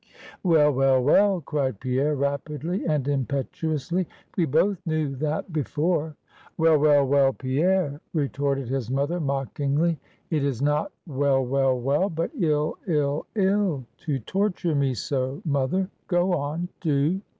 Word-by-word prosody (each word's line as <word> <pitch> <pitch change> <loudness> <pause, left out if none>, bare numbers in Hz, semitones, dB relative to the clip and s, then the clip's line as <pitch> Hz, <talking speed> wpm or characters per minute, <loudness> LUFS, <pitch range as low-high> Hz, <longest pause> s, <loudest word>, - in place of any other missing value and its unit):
"Well, 160 -5 +4
well, 135 0 +3
well," 195 +6 +4
cried 135 -7 -2
Pierre 135 +3 0
rapidly 145 +5 -2
and 150 -4 0
impetuously; 155 +5 -1 0.3
"we 175 - +2
both 170 +6 +1
knew 155 -5 -1
that 155 +4 -2
before." 155 +1 -1 0.4
"Well, 160 -2 +4
well, 145 -1 +5
well, 135 0 +3
Pierre," 145 +3 0
retorted 140 -3 -1
his 130 -2 -2
mother, 140 +7 0
mockingly. 140 +2 0 0.3
"It 155 -3 +1
is 135 -5 -1
not 150 +2 0
well, 135 -3 +1
well, 135 0 +1
well; 140 +10 +1
but 165 -1 -2
ill, 155 - 0
ill, 150 -3 0
ill, 190 - +1
to 145 -4 -2
torture 180 - -1
me 140 -3 +1
so, 130 +4 -2
mother; 145 +6 0 0.2
go 175 0 +2
on, 160 +3 -2
do!" 155 +4 +1
150 Hz, 135 wpm, -25 LUFS, 135-170 Hz, 0.4 s, well